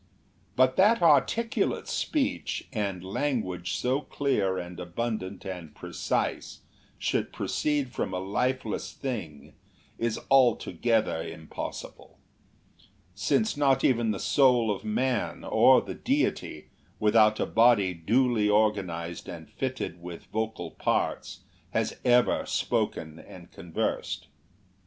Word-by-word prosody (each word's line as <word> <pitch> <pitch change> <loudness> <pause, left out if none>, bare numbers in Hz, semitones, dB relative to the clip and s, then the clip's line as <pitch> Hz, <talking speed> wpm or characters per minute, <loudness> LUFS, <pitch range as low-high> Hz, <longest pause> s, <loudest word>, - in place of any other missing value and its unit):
But 130 0 +3
that 215 +5 +5
articulate 225 +9 +2
speech, 280 -2 -1
and 100 -5 -2
language 95 -5 -2
so 130 +3 0
clear 105 -12 0
and 90 0 -6
abundant 95 +1 -4
and 90 -5 -7
precise, - - -3 0.4
should - - -1
proceed 145 -4 -1
from 105 - -2
a 90 - -2
lifeless 115 +4 -2
thing, 85 - -6 0.5
is 115 -1 -1
altogether 115 -6 +3
impossible; 80 -1 -8 1.0
since 220 - +1
not 135 -2 +2
even 120 -3 +3
the 100 -3 -1
soul 125 -5 +3
of - - -11
man, 120 +2 -1
or - - +5
the - - -6
Deity, - - -1 0.3
without 110 0 +4
a - - +1
body 115 -5 +4
duly 110 +5 +2
organized 95 -6 0
and - - -9
fitted 85 +1 -4
with 85 -1 -8
vocal 110 0 -3
parts, - - -2 0.3
has - - 0
ever 125 0 +3
spoken 80 0 -1
and 85 -2 -13
conversed. 80 0 -3
110 Hz, 110 wpm, -28 LUFS, 90-130 Hz, 1.0 s, that